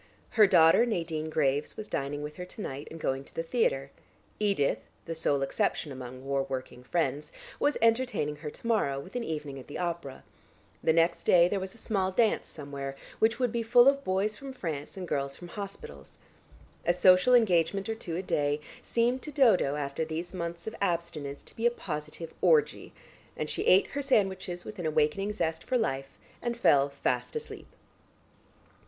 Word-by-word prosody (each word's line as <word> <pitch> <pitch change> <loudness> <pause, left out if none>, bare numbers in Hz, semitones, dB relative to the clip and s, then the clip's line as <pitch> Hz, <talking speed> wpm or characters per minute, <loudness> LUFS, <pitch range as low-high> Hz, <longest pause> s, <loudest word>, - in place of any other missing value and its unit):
Her 220 -4 +6
daughter 165 +2 +6
Nadine 165 -8 -2
Graves 145 -2 0
was 215 - -6
dining 145 -1 -3
with 150 0 -7
her 180 - -5
to 185 - -10
night 140 +3 -6
and 165 - -9
going 135 -2 -1
to - - -14
the 165 - -1
theatre; 140 - 0 0.5
Edith 200 -9 +1 0.3
(the 165 - -4
sole 145 -4 0
exception 140 +2 -1
among 130 0 -8
war 140 0 +1
working 130 -1 -5
friends) 150 0 -1 0.3
was 290 - +2
entertaining 230 - +2
her 150 +1 -6
to 150 - -13
morrow 175 -12 +1
with 185 - -11
an 245 - -1
evening 150 -6 -4
at 130 - -12
the 145 - -6
opera; 170 -6 -4 0.6
the - - +4
next 165 +1 +2
day 175 -1 +5
there 195 +2 -1
was 190 +2 -6
a - - -11
small 195 -4 0
dance 220 +3 +2
somewhere, 140 -2 -6 0.2
which 225 +1 +3
would 250 -2 +1
be 235 0 -1
full 240 +2 +6
of 275 0 +4
boys 200 +1 0
from 270 +3 -8
France 160 - -5
and 185 -2 -5
girls 140 -2 -2
from 175 - -10
hospitals. 180 - -8 0.7
A 175 - +2
social 185 +7 +6
engagement 195 -3 +3
or 225 - -1
two 180 -7 -6
a 185 - -2
day, 145 -4 0 0.2
seemed 240 +2 +1
to 300 - -7
Dodo 225 - +4
after 140 +1 -2
these 160 +3 -5
months 170 -1 -5
of 220 - -5
abstinence 165 -6 -2
to - - -15
be 230 +1 +2
a - - +5
positive 160 -7 -6
orgy, 460 -2 +3 0.5
and - - -2
she - - -2
ate 190 - +6
her 285 - -2
sandwiches 190 -9 0
with 215 -2 -8
an 170 - -1
awakening 155 +7 +1
zest 160 -6 -2
for 255 - +1
life, 135 - -2 0.2
and 240 -1 -2
fell 145 -10 +4
fast 140 - -2
asleep. 460 0 -6
170 Hz, 185 wpm, -29 LUFS, 145-215 Hz, 0.7 s, Her